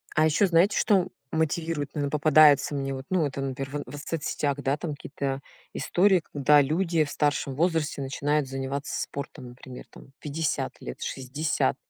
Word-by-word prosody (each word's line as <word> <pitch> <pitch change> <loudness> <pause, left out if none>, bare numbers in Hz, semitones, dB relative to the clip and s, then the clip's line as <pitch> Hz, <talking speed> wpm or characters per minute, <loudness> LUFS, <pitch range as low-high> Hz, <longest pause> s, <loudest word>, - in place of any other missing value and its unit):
А 155 - +4
ещё 160 +6 +3
знаете, 180 +4 +3
что 190 -3 +3 0.2
мотивирует, 160 -2 -1
ну, 145 -2 -2
или 140 - -1
попадается 150 -1 +5
мне, 135 -1 -2
вот, 130 0 -6
ну, 185 -4 +2
это, 140 -1 -4
наперв 135 0 -4
в 145 - -9
соцсетях, 145 -2 -2
да, 140 +1 0
там 155 +1 -4
какие-то 140 -1 -4 0.3
истории, 185 -1 +3
когда 145 +1 +5
люди 165 +3 +1
в 145 - -6
старшем 145 -2 0
возрасте 160 -2 0
начинают 145 +2 0
заниматься 135 +1 -4
спортом, 140 -2 -6
например, 125 +1 -11
там 135 - -16
50 150 +1 -2
лет, 65 - -8
60. 140 +4 -1
145 Hz, 160 wpm, -26 LUFS, 135-160 Hz, 0.3 s, попадается